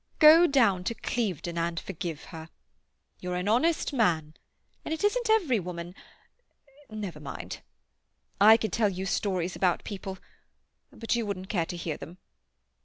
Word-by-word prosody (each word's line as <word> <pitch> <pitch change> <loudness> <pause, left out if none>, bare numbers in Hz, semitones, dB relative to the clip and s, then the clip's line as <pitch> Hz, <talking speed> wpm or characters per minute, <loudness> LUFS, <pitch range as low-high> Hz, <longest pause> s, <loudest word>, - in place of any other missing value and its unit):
Go 320 +3 +8
down 230 - +3
to 230 - -1
Clevedon 180 - -2
and 165 0 -1
forgive 170 -4 -6
her. 160 0 -8 0.7
You're 180 0 -4
an 180 +2 -2
honest 295 +8 +2
man, 165 - +1 0.5
and 315 - -2
it 320 - -7
isn't 465 +3 +1
every 345 - +3
woman—never 200 - -10
mind. 145 -2 -7 0.8
I 220 +2 +9
could 220 -3 -3
tell 220 -3 +2
you 190 0 -4
stories 185 -2 -1
about 180 -2 +1
people—but 200 +3 -7
you 230 -2 -1
wouldn't 190 -1 -5
care 170 -6 0
to 175 - -5
hear 165 -3 -4
them. 175 +3 -10
195 Hz, 140 wpm, -28 LUFS, 175-240 Hz, 0.8 s, I